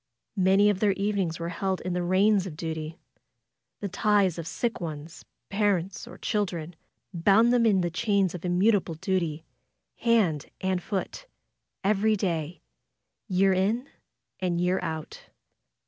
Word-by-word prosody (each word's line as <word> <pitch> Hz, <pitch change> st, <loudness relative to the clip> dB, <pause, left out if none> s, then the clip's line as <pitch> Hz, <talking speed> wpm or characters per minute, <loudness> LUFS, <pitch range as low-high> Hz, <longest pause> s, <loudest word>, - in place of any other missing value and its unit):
Many 195 Hz, +2 st, +5 dB
of 195 Hz, -, -3 dB
their 205 Hz, -2 st, +3 dB
evenings 195 Hz, -4 st, -1 dB
were 170 Hz, 0 st, -3 dB
held 190 Hz, +2 st, -2 dB
in 180 Hz, -, -3 dB
the 180 Hz, -, -1 dB
reins 190 Hz, +2 st, +3 dB
of 155 Hz, -4 st, -8 dB
duty. 160 Hz, -1 st, -5 dB, 0.8 s
Tho 205 Hz, -, -2 dB
ties 200 Hz, -3 st, +2 dB
of 165 Hz, -, -5 dB
sick 230 Hz, +4 st, -2 dB
ones, 155 Hz, -1 st, -7 dB, 0.2 s
parents, 195 Hz, -3 st, 0 dB
or -, -, -11 dB
children, 175 Hz, -5 st, -2 dB, 0.4 s
bound 200 Hz, +7 st, +4 dB
them 235 Hz, -2 st, +4 dB
in 195 Hz, -4 st, +3 dB
the 175 Hz, -1 st, -1 dB
chains 195 Hz, +1 st, +1 dB
of 180 Hz, -, -7 dB
immutable 185 Hz, 0 st, +2 dB
dut}^ 165 Hz, -2 st, -1 dB, 0.5 s
hand 205 Hz, -, +2 dB
and 185 Hz, -1 st, -1 dB
foot, 205 Hz, -, -4 dB, 0.6 s
every 215 Hz, +2 st, +3 dB
day, 170 Hz, -4 st, -3 dB, 0.6 s
year 190 Hz, -1 st, +3 dB
in 215 Hz, +8 st, 0 dB, 0.5 s
and 175 Hz, -2 st, -1 dB
year 180 Hz, +1 st, +1 dB
out. 160 Hz, -1 st, -6 dB
185 Hz, 140 wpm, -27 LUFS, 170-205 Hz, 0.8 s, Many